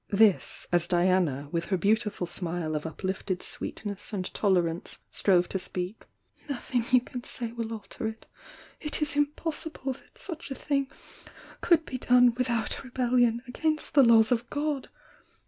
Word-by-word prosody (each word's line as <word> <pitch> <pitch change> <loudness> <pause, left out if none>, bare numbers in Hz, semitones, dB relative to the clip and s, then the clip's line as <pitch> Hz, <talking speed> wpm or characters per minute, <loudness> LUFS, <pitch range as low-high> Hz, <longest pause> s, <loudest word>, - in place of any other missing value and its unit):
— - - -45
this, 205 -1 +3
as 175 -1 +2
Diana, 175 -6 +2
with 170 -1 -1
her 190 - 0
beautiful 210 0 +1
smile 170 -2 -2
of 150 +1 -2
uplifted 185 +2 -3
sweetness 205 -1 -4
and 190 -3 -3
tolerance, 175 -4 +1
strove 180 -3 +3
to 190 - -1
speaJc 180 +1 -3 0.3
— - - -28
"Nothing 245 -3 -1
you 255 -1 +6
can 250 0 -7
say 235 -3 -3
will 230 -1 -4
alter 220 0 -5
it! 220 0 -7 0.5
It 300 0 -1
is 295 - -1
impossible 290 -1 -1
that - - -20
such 335 -5 -7
a 270 - -4
thing 275 -1 -1 0.7
could 325 -2 +4
be 255 - -5
done 245 -1 +5
without 240 -1 -1
rebellion 245 -2 +2
against 310 +5 -1
the 285 - +7
laws 230 -3 +6
of 240 0 +1
God! 290 -2 -2
225 Hz, 160 wpm, -28 LUFS, 185-260 Hz, 0.7 s, the